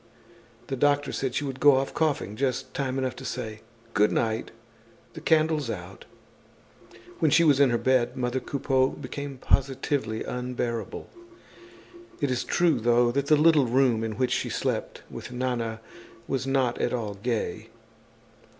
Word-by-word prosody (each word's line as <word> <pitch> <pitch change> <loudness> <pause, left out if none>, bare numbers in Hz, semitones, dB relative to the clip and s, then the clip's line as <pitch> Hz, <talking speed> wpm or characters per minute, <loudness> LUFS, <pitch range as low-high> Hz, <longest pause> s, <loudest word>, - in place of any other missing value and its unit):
The 135 - -3
doctor 145 +2 +2
said 135 -2 -2
she - - 0
would 135 -2 -5
go 145 0 +7
off 135 +1 -1
coughing, 145 - 0
just 130 +1 -2
time 135 -1 -2
enough 130 -1 -1
to - - -8
say: 110 -1 -5 0.3
"Good 105 0 +3
night, 110 -1 -1 0.6
the - - -9
candle's 155 -4 +2
out!" 95 -2 -7 1.1
When 160 - +3
she 160 +4 +5
was 145 -4 +4
in 140 -2 +6
her 120 - +2
bed 130 -1 +1
mother 125 +1 -1
Coupeau 130 -1 +1
became 140 0 -7
positively 130 -4 0
unbearable. 125 -3 -4 1.1
It 145 -4 0
is 125 - 0
true 165 -7 +2
though 120 +1 +3
that 140 +2 -1
the 155 - +6
little 150 -3 +5
room 120 -2 +2
in 110 -1 -2
which 125 +3 0
she - - 0
slept - - -3
with - - -9
Nana 120 -3 -2 0.5
was 135 0 -2
not 130 -3 +1
at - - 0
all 110 -4 -2
gay. 110 +1 -3
130 Hz, 155 wpm, -26 LUFS, 120-140 Hz, 1.1 s, go